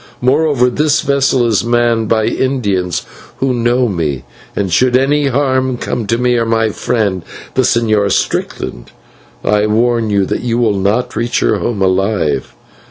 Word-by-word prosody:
Moreover 130 -1 +2
this 150 +3 +1
vessel 135 -3 +1
is 110 -3 +1
manned 120 -2 +1
by 110 -1 +2
Indians 100 -12 -1 0.3
who 135 -1 0
know 120 +1 +1
me, 80 - -2 0.3
and 95 -4 -1
should 125 +5 +3
any 140 +2 +1
harm 130 -1 0
come 120 -2 -3
to 115 - +1
me 125 0 +1
or 115 - +1
to 115 - -3
my 115 -1 +2
friend, 100 -3 -1 0.3
the 130 - +2
Señor 110 -5 +1
Strickland, - - -2 0.5
I 105 0 +2
warn 115 +1 +1
you 100 -2 +2
that - - -3
you 120 -1 -1
will 115 -3 +2
not 105 +6 0
reach 120 +1 -1
your - - +1
home 105 -5 -1
alive. 95 - 0
115 Hz, 165 wpm, -14 LUFS, 105-125 Hz, 0.5 s, should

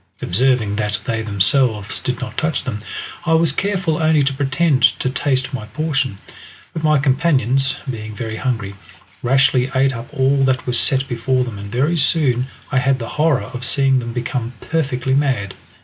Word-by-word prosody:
Observing 110 0 +1
that 105 -1 -1
they 110 -1 -1
themselves 105 +1 +1
did 125 -1 -3
not 130 - -6
touch 155 -2 -1
them, 105 - -4 0.4
I 165 - +1
was 165 0 +3
careful 185 -5 -1
only 155 -2 +4
to 140 0 0
pretend 140 +1 +1 0.2
to 130 - -1
taste 130 -2 -1
my 110 -5 -5
portion; 140 -3 -1 0.6
but 160 - -5
my 155 -1 +4
companions, 135 -2 +1
being 110 -4 -5
very 110 -1 -4
hungry, 115 -6 -2 0.5
rashly 130 0 +3
ate 135 0 +3
up 115 +1 -7
all 135 -1 +2
that 130 -1 0
was 125 -2 +1
set 135 0 +1
before 125 +1 0
them, 115 -5 -6
and 100 0 -8
very 145 +8 +1
soon 135 -4 +2 0.2
I 135 - +3
had 135 +1 +2
the 115 -2 -6
horror 150 -7 +1
of 125 0 -6
seeing 135 +1 +2
them 120 -1 -5
become 120 0 -3
perfectly 130 -5 -1
mad. 130 -9 0
130 Hz, 175 wpm, -19 LUFS, 115-140 Hz, 0.6 s, only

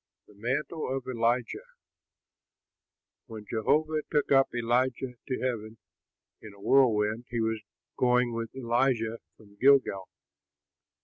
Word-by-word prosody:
THE - - -19
MANTLE 130 +6 -2
OF 135 - -7
ELIJAH 120 -1 0 1.7
When 110 -2 -9
Jehovah 155 +8 +1
took 150 -2 0
up 135 -1 +5
Elijah 125 +2 0
to 130 - -2
heaven 115 -3 -3 0.6
in 105 -2 -11
a - - -18
whirlwind, 110 -1 +2
he 120 - -2
was 110 -1 -1 0.4
going 125 -1 +2
with 115 0 -3
Elisha 120 -2 0 0.2
from 100 -2 -20
Gilgal. 130 -7 +3
120 Hz, 115 wpm, -28 LUFS, 110-130 Hz, 1.7 s, up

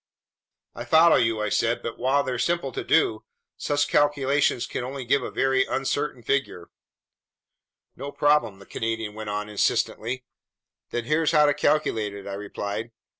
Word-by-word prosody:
"I - - -7
follow 165 +1 +5
you," 115 -2 +1
I 105 - -1
said. 115 +3 0
"But 115 - -5
while 135 +3 +2
they're 125 -3 -3
simple 170 -1 0
to - - -4
do, 110 -9 +2 0.3
such 145 0 0
calculations 145 -3 +2
can - - -4 0.2
give 140 +3 +2
only - - -4
a - - -6
very 135 0 +2
uncertain 135 -1 -2
figure." 120 -9 -2 1.2
"No 140 +2 -6
problem," 145 -7 +2
the 100 - -15
Canadian 110 -1 -3
went 110 0 -7
on 105 0 -3
insistently. 115 +4 -1 0.6
"Then 120 - -3
here's 155 +5 +1
how 150 0 +6
to 145 - +3
calculate 110 -10 0
it," 100 -1 -9
I 100 - -5
replied. 105 +2 -5
125 Hz, 160 wpm, -25 LUFS, 110-145 Hz, 1.2 s, how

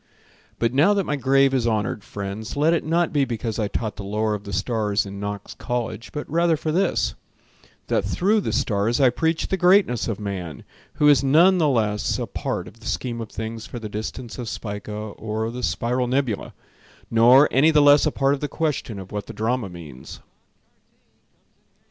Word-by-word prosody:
But 115 +1 0
now 160 +10 +4
that 200 - +1
my 150 - -1
grave 135 0 +3
is 125 -3 +1
honored, 105 -2 -1
friends, 100 +4 -6
Let 155 +3 +3
it 170 - 0
not 170 +2 0
be 145 -2 +3
because 115 -3 -3
I 105 - 0
taught 110 +1 -4
The 105 - -6
lore 105 +2 -1
of 105 0 -5
the 100 - -7
stars 105 0 0
in 100 0 -8
Knox 100 0 -5
College, 120 -1 -4
But 150 - -5
rather 165 +1 +2
for 155 +1 -2
this: 185 +5 +1 0.7
that - - 0
through 210 +4 +1
the - - -2
stars 105 +3 0
I 130 -3 +5
preached 160 +5 -1
the 190 - +1
greatness 180 - +3
of 110 -3 -3
man, 95 -6 -5 0.3
Who 150 - +3
is 145 -2 +5
none 170 +7 +5
the 155 -3 +3
less 105 -5 0
a - - -2
part - - -4
of 115 - -14
the 110 - -10
scheme 120 -2 -3
of 110 - -7
things 110 0 -6
For - - -7
the 110 -2 -6
distance 110 +4 -6
of 120 -3 -4
Spica 105 +3 -6
or 110 +1 -4
the 125 +1 -6
Spiral 125 +1 -1
Nebulae; 125 -4 -1 0.6
Nor 120 +5 +6
any 140 +5 +5
the 155 -2 +4
less 145 +1 +6
a - - +1
part 135 0 +1
of 140 - -2
the 145 - -2
question 145 -7 -2
Of 95 -1 -9
what 105 -1 -5
the 115 - -8
drama 110 0 -1
means. 75 -8 -10
115 Hz, 195 wpm, -23 LUFS, 105-145 Hz, 0.7 s, Nor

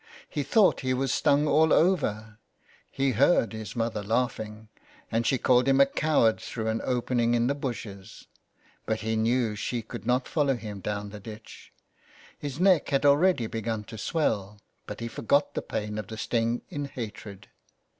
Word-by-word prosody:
He 145 - -3
thought 205 - +3
he 130 -1 0
was 135 0 0
stung 145 +2 +3
all 155 +1 +4
over, 110 - +1 0.5
he 135 0 0
heard 125 0 +3
his 110 -3 -7
mother 115 -2 -1
laugh 115 +5 0
ing, 110 0 -8 0.4
and 115 +1 0
she 135 - +2
called 125 +1 +3
him 135 0 +4
a 140 - +8
coward 140 -5 +2
through 110 -2 -4
an 110 0 -1
open 125 0 -1
ing 120 0 +3
in 120 0 +2
the 135 - +1
bushes, 115 -8 -7 0.6
but 110 0 -1
he 110 0 -1
knew 115 0 +1
she 115 +3 -3
could 110 - -8
not 125 +1 +1
follow 140 -4 +1
him 105 -4 -7
down 105 +1 -4
the 105 - -8
ditch. 110 +2 -11 0.6
His 145 0 -6
neck 185 -4 +4
had 140 +1 +1
already 145 -1 +4
begun 110 -1 -3
to 110 +1 -10
swell, 105 - -1 0.3
but - - -7
he 115 - -3
forgot 140 +5 +1
the - - -2
pain 105 0 -4
of 105 - -6
the 110 - -7
sting 115 +1 -1
in 145 -1 -3
hatred. 105 -6 -8
115 Hz, 180 wpm, -27 LUFS, 110-135 Hz, 0.6 s, a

